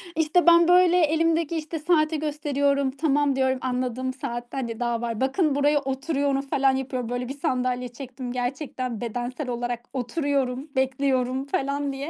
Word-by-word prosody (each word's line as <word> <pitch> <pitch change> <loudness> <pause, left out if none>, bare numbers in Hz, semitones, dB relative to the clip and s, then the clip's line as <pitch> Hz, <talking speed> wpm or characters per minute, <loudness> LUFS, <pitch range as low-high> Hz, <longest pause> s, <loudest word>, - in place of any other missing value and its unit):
İşte, 325 +2 +2
ben 340 0 +7
böyle 360 0 +5
elimdeki, 330 0 +2
işte, 315 +1 -4
saati 310 -1 +2
gösteriyorum. 285 -2 0
"Tamam." 285 -1 +1
diyorum, 260 -1 +1
anladığım 255 0 -2
saat 240 -2 -5
hadi 235 -4 -4
daha 240 -1 -1
var. 230 0 -3
"Bakın 285 +2 +1
buraya 290 +1 +3
oturuyorum." 275 0 -1
falan 270 -1 +2
yapıyorum. 255 -3 -3
Böyle 245 0 -3
bir 280 - -7
sandalye 250 -1 -1
çektim. 250 0 -7
Gerçekten 255 -2 -3
bedensel 245 +4 -4
olarak 240 0 -3
oturuyorum, 270 0 -1
bekliyorum 265 0 0
falan 280 0 -1
diye. 280 +4 -5
270 Hz, 150 wpm, -25 LUFS, 250-295 Hz, -, ben